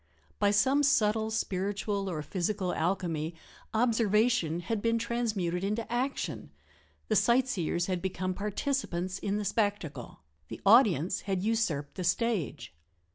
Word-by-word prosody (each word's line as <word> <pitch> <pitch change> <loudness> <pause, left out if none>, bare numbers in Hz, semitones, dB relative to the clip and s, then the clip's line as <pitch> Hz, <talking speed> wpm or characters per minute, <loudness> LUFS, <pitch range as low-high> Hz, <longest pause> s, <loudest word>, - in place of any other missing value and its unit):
By 205 - +4
some 260 +8 +3
subtle 220 -6 +2
spiritual 200 -1 -2
or 155 -4 -3
physical 185 +3 -2
alchemy 165 -2 -1 0.4
observation 220 -6 +2
had 210 +4 -2
been 230 +1 +2
transmuted 210 -7 -1
into 215 +4 -2
action 260 +3 -2 0.6
the 215 - +1
sightseers 225 -8 +2
had 185 -2 -2
become 185 0 -2
participants 200 -3 -2
in 200 0 -1
the 210 - -3
spectacle 205 - -2 0.3
the - - -8
audience 195 - +5
had 190 -1 0
usurped 180 -11 0
the 185 - -2
stage. 180 - -1
200 Hz, 125 wpm, -30 LUFS, 180-225 Hz, 0.6 s, audience